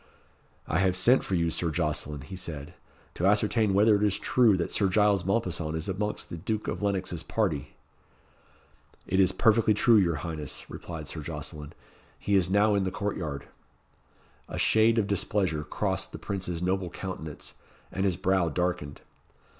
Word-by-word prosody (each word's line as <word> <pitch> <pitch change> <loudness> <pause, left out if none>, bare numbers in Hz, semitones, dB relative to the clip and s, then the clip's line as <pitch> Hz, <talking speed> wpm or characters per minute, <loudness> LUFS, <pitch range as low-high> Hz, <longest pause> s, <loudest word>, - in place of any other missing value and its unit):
"I 80 - +1
have 95 -2 +2
sent 120 +8 +4
for 95 - -2
you, 85 -1 +1
Sir 85 +1 -1
Jocelyn," 75 -3 -2
he 95 +8 -9
said, 80 -4 -6 0.4
"to 90 - 0
ascertain 105 +1 +3
whether 105 +2 +5
it 100 - 0
is 105 -2 +2
true 115 -6 +3
that 85 - -2
Sir 100 - +2
Giles 100 -1 +3
Mompesson 90 -6 -1
is 80 +4 -3
amongst 105 +2 -3
the 85 - -4
Duke 110 +5 -3
of - - -3
Lennox's 95 -4 -1
party." 90 -11 -2 1.3
"It 95 - 0
is 95 -1 +5
perfectly 110 0 +3
true, 115 +2 +5
your 85 -5 +3
highness," 80 -4 -5
replied 80 -3 -7
Sir - - -5
Jocelyn; 75 -1 -6 0.4
"he 100 - -2
is 95 -3 +3
now 105 +2 +3
in 100 -1 +2
the 95 - 0
court 100 +2 -3
yard." 75 -5 -5 1.0
A - - -5
shade 110 +1 +4
of 110 - +3
displeasure 95 -5 0
crossed - - -2
the - - -5
Prince's 90 -3 -4
noble 95 0 0
countenance, 80 -5 -7 0.4
and 95 - -2
his 95 -4 +1
brow 95 -3 +1
darkened. 80 -3 -2
95 Hz, 170 wpm, -28 LUFS, 85-105 Hz, 1.3 s, whether